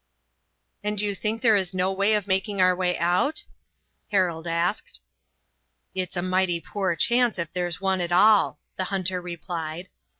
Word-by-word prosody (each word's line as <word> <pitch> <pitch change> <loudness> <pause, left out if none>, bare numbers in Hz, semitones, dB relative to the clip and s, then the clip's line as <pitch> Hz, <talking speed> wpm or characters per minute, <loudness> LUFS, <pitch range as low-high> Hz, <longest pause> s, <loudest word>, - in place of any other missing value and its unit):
"And 210 0 -1
you 205 0 0
think 215 +4 -3
there 225 -3 +6
is 190 -2 0
no 185 +1 +1
way 200 +3 +2
of 210 -2 -1
making 195 +1 -1
our 185 0 +5
way 180 -1 0
out?" 180 - +1 0.7
Harold 175 -4 0
asked. 170 +4 -2 0.9
"It's 185 -1 -3
a 175 - -1
mighty 185 -2 +1
poor 190 0 -2
chance, 240 +5 +2
if 170 -2 -4
there's 175 -2 -2
one 190 -1 0
at 175 0 -3
all," 205 +3 +5 0.2
the 185 - -1
hunter 185 -1 -2
replied. 170 0 -6
185 Hz, 160 wpm, -25 LUFS, 175-200 Hz, 0.9 s, there